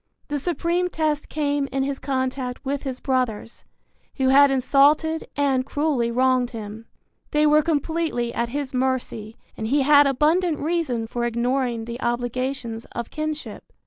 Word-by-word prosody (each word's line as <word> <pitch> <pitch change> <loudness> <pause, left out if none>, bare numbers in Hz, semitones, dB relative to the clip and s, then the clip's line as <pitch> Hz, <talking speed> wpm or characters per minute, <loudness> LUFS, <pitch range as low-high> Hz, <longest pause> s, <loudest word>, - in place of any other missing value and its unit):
The 290 0 -1
supreme 345 +3 0
test 305 -3 -1
came 290 -2 -1
in 270 0 0
his 275 0 -3
contact 260 -1 -3
with 275 +1 -2
his 260 -2 -5
brothers, 250 -4 -2 0.5
who 265 -1 +1
had 280 +1 +7
insulted 285 +4 +3
and 275 -2 +1
cruelly 275 -4 0
wronged 255 0 +2
him. 220 -1 -8 0.4
They 300 0 +2
were 300 0 +5
completely 310 -5 -1
at 235 0 -1
his 280 +1 -4
mercy 250 -4 -2 0.2
and 220 - -4
he 280 +4 +2
had 290 0 +6
abundant 310 +5 +2
reason 300 -8 -1
for 240 +1 -4
ignoring 240 0 -1
the 235 +2 -7
obligations 245 -1 -2
of 235 -1 -5
kinship. 310 0 -5
270 Hz, 145 wpm, -23 LUFS, 245-295 Hz, 0.5 s, had